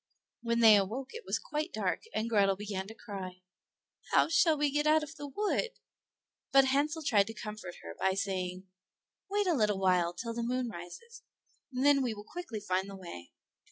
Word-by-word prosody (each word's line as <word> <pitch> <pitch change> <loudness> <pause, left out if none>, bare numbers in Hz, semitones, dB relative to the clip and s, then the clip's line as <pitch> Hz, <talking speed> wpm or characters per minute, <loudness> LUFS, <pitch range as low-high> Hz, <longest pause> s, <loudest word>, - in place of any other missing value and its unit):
When 235 0 +1
they 220 -2 +9
awoke 230 +7 -2
it 465 +1 -8
was - - +1
quite 305 +3 -3
dark, - - -1
and 220 - -1
Grethel 200 -4 +3
began 195 -1 -4
to 220 - -10
cry; 185 -5 -8 0.7
"How - - +5
shall 330 -1 +4
we 290 -1 +1
get 295 +1 +1
out 310 0 +5
of 295 - -7
the 290 - -7
wood?" 420 - -1 0.8
But 270 0 +7
Hansel 295 +4 +1
tried 205 -7 +3
to 225 - -7
comfort 210 -4 -7
her 85 0 -8
by 190 0 +2
saying, 185 -2 -2 0.6
"Wait 410 +1 +1
a 360 - +3
little 210 -7 +2
while 180 -2 +2
till 230 +5 -4
the 235 - -3
moon 245 +1 -1
rises, 230 - -10 0.5
and 255 +1 -1
then 285 -1 +6
we 240 -4 -1
will 205 0 -10
quickly 350 -11 -6
find 190 +1 -1
the 195 - -8
way." 170 - -9
225 Hz, 195 wpm, -31 LUFS, 195-290 Hz, 0.8 s, they